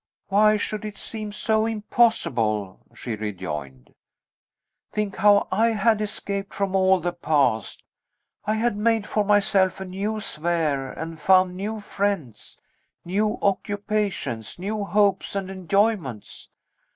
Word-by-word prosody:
"Why 215 Hz, +2 st, +5 dB
should 210 Hz, 0 st, -3 dB
it 210 Hz, -1 st, -6 dB
seem 215 Hz, -2 st, -5 dB
so 220 Hz, +1 st, +1 dB
impossible?" 165 Hz, -, +1 dB, 0.2 s
she 115 Hz, -3 st, -4 dB
rejoined. 75 Hz, -, -6 dB, 1.0 s
"Think 210 Hz, -2 st, -2 dB
how 205 Hz, 0 st, +5 dB
I 225 Hz, +4 st, +3 dB
had 215 Hz, +1 st, +2 dB
escaped 200 Hz, -1 st, -4 dB
from 195 Hz, -1 st, -1 dB
all 190 Hz, 0 st, +4 dB
the 175 Hz, +1 st, -2 dB
past! 140 Hz, -, 0 dB, 0.6 s
I 215 Hz, +1 st, +1 dB
had 225 Hz, 0 st, +1 dB
made 220 Hz, 0 st, +1 dB
for 210 Hz, -, 0 dB
myself 195 Hz, -2 st, +3 dB
a 190 Hz, -, -5 dB
new 200 Hz, +4 st, -3 dB
sphere, 155 Hz, -7 st, -1 dB
and 160 Hz, -1 st, -7 dB
found 185 Hz, +1 st, +4 dB
new 210 Hz, +4 st, -4 dB
friends, 195 Hz, -, -3 dB, 0.5 s
new 210 Hz, +5 st, 0 dB
occupations, 200 Hz, -, -1 dB
new 205 Hz, +3 st, -3 dB
hopes 200 Hz, -1 st, +1 dB
and 195 Hz, -1 st, -3 dB
enjoyments. 190 Hz, -, -1 dB
195 Hz, 125 wpm, -24 LUFS, 165-210 Hz, 1.0 s, Why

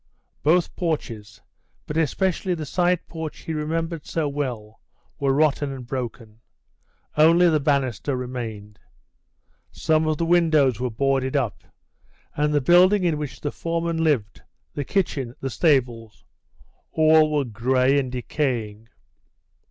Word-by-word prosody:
Both 170 Hz, +3 st, +2 dB
porches, 115 Hz, -, -4 dB, 0.4 s
but 150 Hz, -, -6 dB
especially 180 Hz, +3 st, 0 dB
the 160 Hz, -2 st, -5 dB
side 175 Hz, +3 st, 0 dB
porch 160 Hz, -2 st, -7 dB
he 160 Hz, -, -5 dB
remembered 165 Hz, +1 st, -3 dB
so 160 Hz, -3 st, -1 dB
well, 125 Hz, -7 st, -5 dB, 0.4 s
were 140 Hz, -1 st, +1 dB
rotten 145 Hz, 0 st, +1 dB
and 130 Hz, -2 st, -7 dB
broken; 120 Hz, -3 st, -6 dB, 0.8 s
only 165 Hz, +3 st, +6 dB
the 155 Hz, -, +2 dB
banister 140 Hz, -2 st, 0 dB
remained. 110 Hz, -5 st, -6 dB, 0.9 s
Some 155 Hz, 0 st, +1 dB
of 155 Hz, -1 st, 0 dB
the 165 Hz, -, -1 dB
windows 160 Hz, -8 st, +3 dB
were 125 Hz, 0 st, -1 dB
boarded 135 Hz, +3 st, 0 dB
up, 125 Hz, -8 st, -1 dB, 0.7 s
and 150 Hz, +1 st, +1 dB
the 145 Hz, -1 st, +2 dB
building 180 Hz, +7 st, +5 dB
in 165 Hz, -4 st, +1 dB
which 135 Hz, -5 st, -6 dB
the 145 Hz, -, -2 dB
foreman 165 Hz, 0 st, -2 dB
lived, 120 Hz, -, 0 dB, 0.3 s
the 145 Hz, -, -3 dB
kitchen, 135 Hz, -, -2 dB
the 135 Hz, -, -4 dB
stables 120 Hz, -9 st, 0 dB, 0.7 s
all 155 Hz, -1 st, +5 dB
were 145 Hz, -2 st, +1 dB
grey 130 Hz, +4 st, +2 dB
and 130 Hz, -2 st, -3 dB
decaying. 120 Hz, -5 st, -3 dB
145 Hz, 130 wpm, -23 LUFS, 125-160 Hz, 0.9 s, only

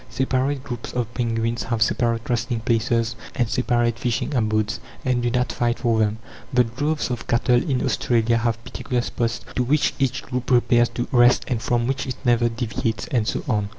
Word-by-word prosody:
Separate 130 Hz, +1 st, 0 dB
groups 120 Hz, -4 st, -6 dB
of 120 Hz, -1 st, -2 dB
penguins 115 Hz, -1 st, -1 dB
have 115 Hz, 0 st, +1 dB
separate 115 Hz, +1 st, 0 dB
resting 120 Hz, 0 st, -1 dB
places 115 Hz, 0 st, +1 dB, 0.2 s
and 120 Hz, -, +1 dB
separate 120 Hz, 0 st, +1 dB
fishing 120 Hz, +4 st, -1 dB
abodes, 110 Hz, -3 st, 0 dB, 0.3 s
and 125 Hz, -1 st, +1 dB
do 120 Hz, -, +1 dB
not 125 Hz, 0 st, 0 dB
fight 120 Hz, +1 st, 0 dB
for 115 Hz, -3 st, +1 dB
them. 110 Hz, 0 st, +1 dB, 0.3 s
The 125 Hz, -2 st, +4 dB
droves 145 Hz, +5 st, -2 dB
of 120 Hz, -, -4 dB
cattle 120 Hz, +1 st, +3 dB
in 130 Hz, -2 st, +1 dB
Australia 115 Hz, -1 st, +2 dB
have 115 Hz, 0 st, -1 dB
particular 125 Hz, 0 st, -2 dB
spots 115 Hz, -4 st, -2 dB
to -, -, +1 dB
which 140 Hz, +4 st, +2 dB
each 130 Hz, -1 st, 0 dB
group 125 Hz, -1 st, -4 dB
repairs 120 Hz, -1 st, +4 dB
to 120 Hz, -, -2 dB
rest, 120 Hz, -1 st, +5 dB
and 120 Hz, -4 st, -1 dB
from 120 Hz, +1 st, +1 dB
which 135 Hz, +2 st, -2 dB
it 130 Hz, -, -3 dB
never 120 Hz, -1 st, +3 dB
deviates; 115 Hz, -1 st, -2 dB
and 120 Hz, -7 st, +1 dB
so -, -, -1 dB
on. 105 Hz, -5 st, 0 dB
120 Hz, 185 wpm, -23 LUFS, 115-125 Hz, 0.3 s, rest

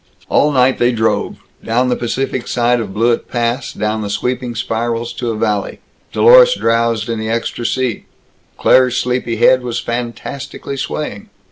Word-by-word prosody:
All 150 Hz, -, +3 dB
night 130 Hz, -1 st, +3 dB
they 120 Hz, +1 st, +3 dB
drove; 110 Hz, -2 st, 0 dB, 0.3 s
down 125 Hz, +3 st, +1 dB
the 125 Hz, -, +1 dB
Pacific 130 Hz, +1 st, -3 dB
side 120 Hz, 0 st, +1 dB
of 105 Hz, -4 st, -4 dB
Blewett 115 Hz, +4 st, 0 dB
Pass; 120 Hz, +2 st, -1 dB
down 105 Hz, +1 st, -2 dB
the 105 Hz, -, -4 dB
sweeping 125 Hz, +3 st, -2 dB
spirals 115 Hz, +1 st, -2 dB
to 120 Hz, -, -3 dB
a 115 Hz, -, -2 dB
valley. 105 Hz, -2 st, -1 dB, 0.3 s
Dlorus -, -, +6 dB
drowsed 115 Hz, -2 st, +1 dB
in 115 Hz, -1 st, -2 dB
the 110 Hz, 0 st, -3 dB
extra 115 Hz, +1 st, -2 dB
seat. 130 Hz, -4 st, -2 dB, 0.5 s
Claire's 130 Hz, -1 st, +4 dB
sleepy 125 Hz, -2 st, -1 dB
head 120 Hz, +3 st, +4 dB
was 120 Hz, -1 st, -3 dB
fantastically 125 Hz, +4 st, -5 dB
swaying. 135 Hz, -6 st, -5 dB
120 Hz, 155 wpm, -16 LUFS, 115-125 Hz, 0.5 s, Dlorus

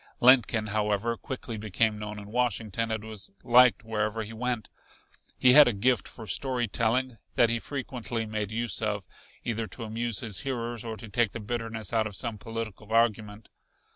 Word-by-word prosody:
Lincoln, 120 Hz, -3 st, +5 dB
however, 105 Hz, +2 st, 0 dB
quickly 120 Hz, -1 st, -6 dB
became 105 Hz, +1 st, 0 dB
known 105 Hz, 0 st, -6 dB
in 105 Hz, 0 st, -9 dB
Washington 115 Hz, -2 st, 0 dB
and 110 Hz, -1 st, -2 dB
was 110 Hz, -3 st, -8 dB
liked 125 Hz, -2 st, +6 dB
wherever 110 Hz, 0 st, -1 dB
he 110 Hz, +1 st, -8 dB
went. 120 Hz, 0 st, -2 dB, 0.7 s
He 125 Hz, -1 st, +6 dB
had 150 Hz, 0 st, +9 dB
a 120 Hz, -, +2 dB
gift 120 Hz, +5 st, +1 dB
for 115 Hz, -, -9 dB
story 125 Hz, +5 st, -1 dB
telling 115 Hz, +3 st, 0 dB, 0.2 s
that 115 Hz, -1 st, +4 dB
he 115 Hz, -, 0 dB
frequently 120 Hz, -4 st, -4 dB
made 105 Hz, -1 st, -3 dB
use 115 Hz, +1 st, -1 dB
of, 105 Hz, -3 st, -1 dB, 0.4 s
either 115 Hz, -1 st, -2 dB
to 115 Hz, -, -6 dB
amuse 115 Hz, 0 st, -1 dB
his 110 Hz, -7 st, -3 dB
hearers 120 Hz, -4 st, -3 dB
or 115 Hz, -2 st, -5 dB
to 115 Hz, -, -9 dB
take 115 Hz, -1 st, +1 dB
the -, -, -5 dB
bitterness 115 Hz, -1 st, -4 dB
out 110 Hz, -1 st, +2 dB
of 105 Hz, -, -8 dB
some 115 Hz, -1 st, -3 dB
political 110 Hz, -2 st, -6 dB
argument. 110 Hz, -2 st, +1 dB
115 Hz, 175 wpm, -28 LUFS, 105-120 Hz, 0.7 s, had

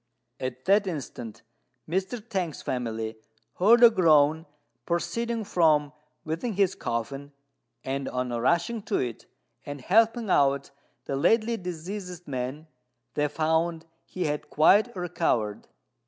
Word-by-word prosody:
At 130 Hz, 0 st, -5 dB
that 200 Hz, +1 st, +4 dB
instant 125 Hz, -, -6 dB, 0.4 s
Mr. 190 Hz, +7 st, -3 dB
T'ang's 185 Hz, -8 st, -3 dB
family 110 Hz, -3 st, -3 dB, 0.4 s
heard 230 Hz, +6 st, +6 dB
a 235 Hz, -, +10 dB
groan 160 Hz, -5 st, +4 dB, 0.4 s
proceeding 225 Hz, +7 st, -1 dB
from 155 Hz, -6 st, +2 dB, 0.3 s
within 165 Hz, +9 st, -3 dB
his 195 Hz, -1 st, +2 dB
coffin, 135 Hz, +4 st, -4 dB, 0.5 s
and, 135 Hz, 0 st, -3 dB
on 125 Hz, 0 st, -2 dB
rushing 170 Hz, -, +1 dB
to 210 Hz, -, +2 dB
it 120 Hz, -3 st, -4 dB, 0.4 s
and 145 Hz, 0 st, -7 dB
helping 225 Hz, -, +3 dB
out 140 Hz, -2 st, +2 dB, 0.3 s
the 135 Hz, -, -2 dB
lately 220 Hz, +10 st, +2 dB
deceased 180 Hz, -1 st, -6 dB
man, 130 Hz, +3 st, -4 dB, 0.5 s
they 150 Hz, 0 st, +1 dB
found 160 Hz, +2 st, 0 dB, 0.2 s
he 185 Hz, -, -3 dB
had 150 Hz, -1 st, -3 dB
quite 205 Hz, -, +4 dB
recovered. 160 Hz, -, -1 dB
160 Hz, 120 wpm, -27 LUFS, 140-195 Hz, 0.5 s, a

